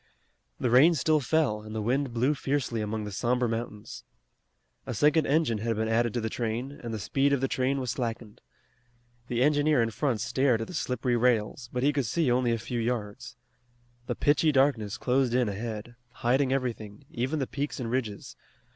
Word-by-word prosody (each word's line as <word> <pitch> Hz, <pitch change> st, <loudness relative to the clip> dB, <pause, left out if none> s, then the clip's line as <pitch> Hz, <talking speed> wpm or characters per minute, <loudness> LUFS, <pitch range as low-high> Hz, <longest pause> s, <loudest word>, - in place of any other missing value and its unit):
The 125 Hz, -, 0 dB
rain 150 Hz, +8 st, +6 dB
still 155 Hz, +2 st, +2 dB
fell 140 Hz, -6 st, +1 dB
and 110 Hz, +1 st, -9 dB
the -, -, -1 dB
wind 130 Hz, +3 st, 0 dB
blew 125 Hz, +5 st, +1 dB
fiercely 135 Hz, -5 st, -1 dB
among 105 Hz, +1 st, -3 dB
the 105 Hz, -, -6 dB
somber 125 Hz, +4 st, 0 dB
mountains. 115 Hz, -2 st, -5 dB, 0.8 s
A -, -, -3 dB
second 150 Hz, +1 st, +3 dB
engine 140 Hz, -7 st, +2 dB
had 115 Hz, +1 st, -1 dB
been 110 Hz, +1 st, -1 dB
added 115 Hz, +1 st, +2 dB
to -, -, +1 dB
the 110 Hz, -, -2 dB
train, 115 Hz, +3 st, -3 dB
and 120 Hz, -5 st, -8 dB
the 110 Hz, -, -3 dB
speed 135 Hz, +8 st, +1 dB
of 140 Hz, -, +2 dB
the 135 Hz, -, 0 dB
train 130 Hz, +2 st, 0 dB
was 125 Hz, -3 st, -2 dB
slackened. 115 Hz, -4 st, -5 dB, 0.9 s
The 120 Hz, 0 st, +1 dB
engineer 150 Hz, 0 st, +3 dB
in 115 Hz, -1 st, +1 dB
front 125 Hz, 0 st, -1 dB
stared 120 Hz, 0 st, +2 dB
at 115 Hz, -, -3 dB
the -, -, -10 dB
slippery 125 Hz, -1 st, -1 dB
rails, 120 Hz, 0 st, +1 dB
but 125 Hz, 0 st, -2 dB
he 145 Hz, +1 st, +3 dB
could 140 Hz, -5 st, 0 dB
see 155 Hz, +2 st, +1 dB
only 125 Hz, -1 st, +2 dB
a 115 Hz, -, +1 dB
few 120 Hz, +2 st, -4 dB
yards. 115 Hz, -3 st, -3 dB, 0.7 s
The -, -, -2 dB
pitchy 150 Hz, +2 st, +3 dB
darkness 130 Hz, -7 st, +2 dB
closed 125 Hz, -1 st, +1 dB
in 125 Hz, -2 st, +2 dB
ahead, 110 Hz, +2 st, -5 dB, 0.3 s
hiding 130 Hz, +2 st, +3 dB
everything, 115 Hz, -6 st, -3 dB
even 130 Hz, +6 st, -2 dB
the 135 Hz, -, 0 dB
peaks 145 Hz, +3 st, -4 dB
and 115 Hz, -2 st, -3 dB
ridges. 115 Hz, -6 st, -3 dB
125 Hz, 190 wpm, -28 LUFS, 115-135 Hz, 0.9 s, rain